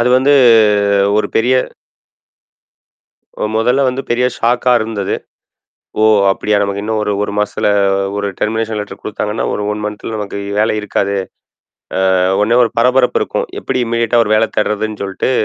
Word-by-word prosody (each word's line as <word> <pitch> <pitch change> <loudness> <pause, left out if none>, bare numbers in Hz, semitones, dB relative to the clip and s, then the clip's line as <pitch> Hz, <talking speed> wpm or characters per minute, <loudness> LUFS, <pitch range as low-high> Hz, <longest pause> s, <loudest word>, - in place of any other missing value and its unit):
அது 120 - +2
வந்து 140 +3 +3 0.8
ஒரு - - 0
பெரிய 125 +3 +2 1.8
அ - - 0
முதல்ல 125 +5 +2
வந்து 130 +2 -4
பெரிய 120 +1 +1
ஷாக்கா 120 +2 +1
இருந்தது. 110 -3 -3 0.9
"ஓ! - - +5 0.3
அப்படியா! 105 +2 0
நமக்கு 100 0 -3
இன்னும் 110 0 -2
ஒரு, 105 -1 -1
1 100 - -5
மாசத்துல 105 0 0 0.5
ஒரு 100 0 -2
டெர்மினேஷன் 110 0 -1
லெட்டர் 100 -1 -8
குடுத்தாங்கன்னா, 105 +1 -3
ஒரு 105 - -3
1 105 0 -5
மன்த்துல 105 +1 -5
நமக்கு 105 -1 -5 0.2
வேலை 110 0 +1
இருக்காது." 100 -1 -1 1.0
அ - - +2 0.2
உடனே 115 +3 +2
ஒரு 115 - -2
பரபரப்பு 125 +1 +2
இருக்கும். - - -3
எப்படி 125 - -2
இமீடியேட்டா 115 0 +1
ஒரு 110 - -1
வேலை 110 +1 +2
தேடுறதுன்னு 105 0 -1
சொல்லிட்டு, 95 +5 -2
110 Hz, 150 wpm, -15 LUFS, 105-120 Hz, 1.8 s, ஓ